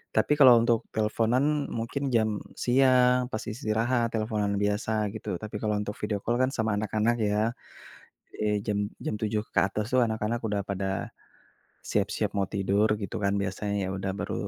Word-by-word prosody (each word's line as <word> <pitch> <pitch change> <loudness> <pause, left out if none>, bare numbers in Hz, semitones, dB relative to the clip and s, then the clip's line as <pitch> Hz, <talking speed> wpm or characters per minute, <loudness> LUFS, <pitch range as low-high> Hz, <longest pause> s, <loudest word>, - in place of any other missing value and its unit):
Tapi 110 +7 +3
kalau 130 -4 +9
untuk 115 -1 +3 0.2
teleponan 125 +7 +1
mungkin 115 +5 -4
jam 110 -2 +1 0.2
siang 125 -1 +3
pas 110 - -3
istirahat 115 +2 0
teleponan 110 -2 -1
biasa 105 +2 0 0.2
gitu. 110 -4 -4
Tapi 105 0 -7
kalau 105 -1 0
untuk 105 0 -5
video 105 -1 -1
call 120 +1 0
kan 130 - +3
sama 110 -1 0
anak-anak 110 +2 +1
ya, 105 - 0 1.0
eee, 105 -1 0
jam 105 -2 0 0.3
jam - - -1
7 105 -1 0
ke - - +4
atas 105 +1 -3
tuh 130 - +5
anak-anak 110 +1 -2
udah 100 -1 -1
pada, 95 0 -2 0.8
siap-siap 100 +1 0
mau 100 - +1
tidur 100 +2 +2
gitu 100 - -4
kan 100 - +2
biasanya 100 +2 -3
ya 95 - -2
udah 95 0 -2
baru - - -3
110 Hz, 165 wpm, -27 LUFS, 105-120 Hz, 1.0 s, kalau